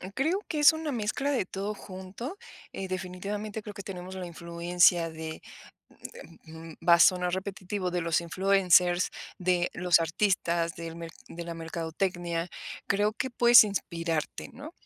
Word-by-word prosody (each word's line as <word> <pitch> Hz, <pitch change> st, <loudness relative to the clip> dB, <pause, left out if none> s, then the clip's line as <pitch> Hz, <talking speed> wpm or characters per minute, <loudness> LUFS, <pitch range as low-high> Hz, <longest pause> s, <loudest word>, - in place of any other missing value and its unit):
Creo 320 Hz, +9 st, +1 dB
que 305 Hz, -, -2 dB
es 295 Hz, -, +8 dB
una 315 Hz, -3 st, -4 dB
mezcla 235 Hz, +6 st, -1 dB
de 255 Hz, -9 st, 0 dB
todo 200 Hz, +3 st, -4 dB
junto, 195 Hz, -, -8 dB, 0.3 s
eh, 190 Hz, -, -5 dB
definitivamente 195 Hz, +4 st, -5 dB
creo 210 Hz, -1 st, -9 dB
que 200 Hz, -, -8 dB
tenemos 185 Hz, -1 st, -7 dB
la 185 Hz, -1 st, -5 dB
influencia 170 Hz, 0 st, +2 dB
de 160 Hz, 0 st, -7 dB, 1.1 s
mm, -, -, -18 dB, 0.2 s
eh, -, -, -16 dB
mm, -, -, -12 dB
va 170 Hz, -, +9 dB
a -, -, +4 dB
sonar 180 Hz, 0 st, +4 dB
repetitivo, 190 Hz, -1 st, -4 dB
de 175 Hz, 0 st, -1 dB
los 170 Hz, 0 st, +1 dB
influencers, 180 Hz, 0 st, +3 dB, 0.3 s
de 180 Hz, -1 st, +1 dB
los 180 Hz, -1 st, +3 dB
artistas, 170 Hz, -1 st, 0 dB
del 165 Hz, 0 st, -7 dB
mer 165 Hz, -1 st, -7 dB, 0.2 s
de 170 Hz, 0 st, -7 dB
la 170 Hz, -, -5 dB
mercadotecnia. 170 Hz, +1 st, -3 dB, 0.4 s
Creo 205 Hz, +2 st, +1 dB
que 260 Hz, +4 st, -3 dB
puedes 240 Hz, -1 st, +8 dB
inspirarte, 165 Hz, -6 st, -3 dB
¿no? 290 Hz, +5 st, -9 dB
185 Hz, 160 wpm, -28 LUFS, 170-205 Hz, 1.1 s, va